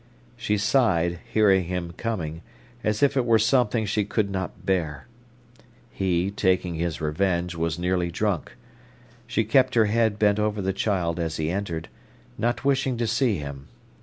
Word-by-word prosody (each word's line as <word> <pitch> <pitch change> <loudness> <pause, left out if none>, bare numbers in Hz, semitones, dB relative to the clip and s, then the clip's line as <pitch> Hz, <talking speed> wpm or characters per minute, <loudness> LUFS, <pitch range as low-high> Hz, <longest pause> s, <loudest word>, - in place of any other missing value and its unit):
She 105 -3 -1
sighed, 95 -7 +2
hearing 100 -4 +4
him 90 -1 -3
coming, 85 -7 -4 0.4
as 110 +4 0
if 140 0 +3
it 130 - +2
were 115 -2 +4
something 115 0 +2
she 105 +1 0
could 100 0 -1
not 95 -2 -5
bear. 80 -7 -1 0.9
He, 95 0 0
taking 95 -3 +1
his 85 -1 -2
revenge, 85 +3 0
was 85 -1 -2
nearly 90 0 0
drunk. 95 -1 -2 0.7
She 115 -2 +1
kept 130 +5 +3
her 115 -2 +5
head 110 0 +1
bent 105 0 +3
over 105 0 0
the 95 0 -1
child 90 -4 -1
as 80 -1 -2
he 80 +1 -1
entered, 90 -4 -3 0.5
not 120 - -1
wishing 135 -2 +1
to 120 - 0
see 115 -2 +1
him. 70 -2 -7
100 Hz, 160 wpm, -25 LUFS, 85-110 Hz, 0.9 s, her